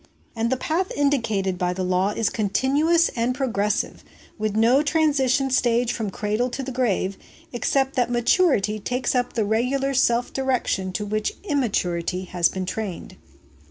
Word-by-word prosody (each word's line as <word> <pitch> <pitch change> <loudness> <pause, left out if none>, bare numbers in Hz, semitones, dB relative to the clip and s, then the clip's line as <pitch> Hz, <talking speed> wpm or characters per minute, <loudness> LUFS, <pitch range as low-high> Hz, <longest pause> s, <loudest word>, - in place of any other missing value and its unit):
And 225 +1 0
the 260 - +1
path 335 +8 -1
indicated 220 -10 0
by 180 0 0
the 185 +1 -3
law 185 +2 +1
is 210 0 -1
continuous 280 - +2
and 240 +1 -1
progressive, 215 -6 -1 0.3
with 215 -1 -2
no 235 +5 +4
transition 280 -4 +1
stage 240 -1 +2
from 220 -3 -3
the - - -4
cradle 215 +5 -1
to 270 +2 -5
the 265 - -5
grave, 215 -6 -1 0.3
except 270 +3 0
that 245 -1 +2
maturity 240 - +2
takes 250 +5 -1
up 245 -1 0
the 220 -3 0
regular 255 +6 0
self 245 -2 +2
direction 255 -8 -1
to 210 - -3
which 215 +1 -2
immaturity 185 - -1
has 175 -2 +1
been 190 -1 -4
trained. 195 -1 -5
235 Hz, 160 wpm, -23 LUFS, 205-265 Hz, 0.3 s, no